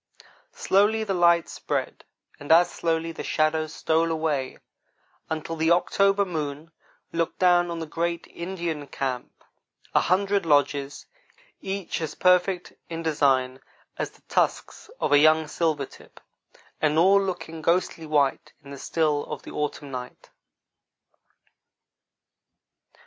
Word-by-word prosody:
Slowly 210 +3 +2
the 200 -2 -2
light 170 -2 +4
spread - - -4 0.3
and 145 - -4
as 175 +2 +6
slowly 165 0 -1
the 165 - -7
shadows 155 0 0
stole 165 +1 +1
away 155 -5 -1 0.7
until 160 +1 -3
the 160 0 +1
October 195 +3 +3
moon 155 -2 -5 0.4
looked 165 0 -1
down 175 -1 +4
on 170 - -4
the 165 - -4
great 170 +2 -2
Indian 170 -4 -5
camp 130 -3 -5 0.5
a - - +5
hundred 200 +1 +1
lodges, 145 -2 +1 0.6
each 195 -3 -4
as 155 -2 -4
perfect 180 0 +2 0.2
in 165 0 -5
design 135 -4 +1 0.3
as - - -3
the - - -24
tusks - - -1
of - - -1
a 145 - +7
young 155 +1 +4
silver 155 -3 -1
tip, - - -17 0.6
and 155 0 +2
all 195 +4 +5
looking 175 -4 -5
ghostly 170 -1 0
white 145 -3 +1
in 140 - -12
the 140 - -8
still 150 -2 0
of - - -7
the - - -10
autumn 145 -1 -4
night. 125 -1 -8
160 Hz, 130 wpm, -25 LUFS, 150-175 Hz, 0.7 s, a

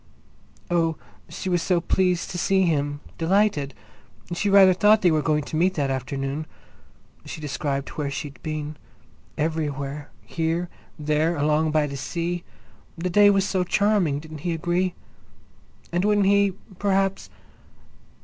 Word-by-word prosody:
Oh, 165 -2 +2 0.3
she - - -6
was 175 -2 +1
so 180 0 +2
pleased 180 +1 0
to 180 - -4
see 190 +2 +3
him—delighted! 155 +1 0 0.6
She 200 +4 0
rather 195 -1 +7
thought 210 +3 +4
they 175 - +5
were 155 -1 +2
going 150 0 +1
to 155 - -6
meet 180 +4 +2
that 140 -3 0
afternoon. 135 +3 -3 0.8
She - - -8
described 140 -1 -3
where 145 -2 -3
she'd 140 -1 -6
been—everywhere, 150 -1 -5 0.2
here, 165 +1 -2 0.3
there, 155 +2 +1
along 155 +1 +2
by 155 -1 +2
the 140 -1 -5
sea. 170 +5 -3 0.5
The 180 +2 -2
day 205 +2 +6
was 195 -1 +2
so 185 -2 +1
charming—didn't 165 -7 0
he 170 +3 -2
agree? 175 +2 0 1.0
And 175 +2 0
wouldn't 205 -1 +3
he, 200 0 +4 0.3
perhaps?... 195 -1 0
165 Hz, 130 wpm, -24 LUFS, 150-185 Hz, 1.0 s, rather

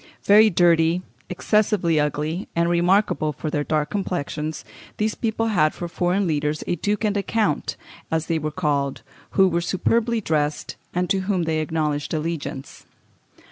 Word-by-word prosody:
Very 215 +2 +7
dirty, 170 -1 +3 0.3
excessively 185 -3 +1
ugly, 150 +5 -2
and 170 0 +2
remarkable 175 -2 +2
for 150 +2 -5
their 145 -1 0
dark 150 -1 -1
complexions, 160 -6 -3 0.3
these 215 0 0
people 225 0 -1
had 155 -7 +2
for 175 - -5
their 175 +2 0
leaders 155 -5 -1
a - - -1
duke 205 +3 -1
and 210 -1 +1
a 200 - +1
count, 220 +2 -1 0.3
as 160 0 0
they 165 -1 0
were 155 0 -2
called, 145 -4 -1 0.3
who 190 -1 +6
were 170 -1 0
superbly 230 +6 +1
dressed, 150 -6 -1 0.2
and 180 +1 -1
to 195 - +2
whom 185 -4 +1
they 160 -1 0
acknowledged 155 -1 -1
allegiance. 155 -4 -5
170 Hz, 155 wpm, -23 LUFS, 155-195 Hz, 0.3 s, Very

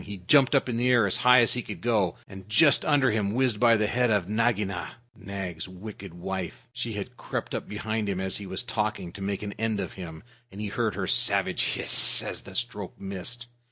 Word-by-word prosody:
He 100 0 -7
jumped 135 +10 +4
up 135 - +2
in 120 -2 -2
the 125 +2 +1
air 120 -4 +5
as 95 - +1
high 125 0 +6
as 115 - +3
he 125 - 0
could - - -8
go, 105 -7 +1
and 95 0 -12
just 145 +7 +5
under 145 -4 +3
him 105 -1 -1
whizzed 125 -5 +1
by 115 -2 +5
the 105 - +1
head 125 +3 +1
of 100 -5 +1
Nagaina, 105 -5 -1 0.2
Nag's 95 -4 -6
wicked 95 -1 -10
wife. 95 0 -5
She 120 -2 -3
had 100 -2 -6
crept - - -5
up - - -4
behind 110 0 -3
him 95 -2 -2
as 95 -1 -2
he 100 - -7
was 95 +3 -3
talking, 105 -6 -3
to 100 - -11
make 100 +1 -3
an 100 -1 -5
end 110 -2 0
of - - -4
him. 85 -3 -9 0.3
He 105 +2 -5
heard 110 -2 -1
her 95 -1 -2
savage - - +2
hiss - - +5
as - - -4
the 95 - -13
stroke 105 -4 -4
missed. 100 +6 -5
105 Hz, 220 wpm, -27 LUFS, 95-120 Hz, 0.3 s, high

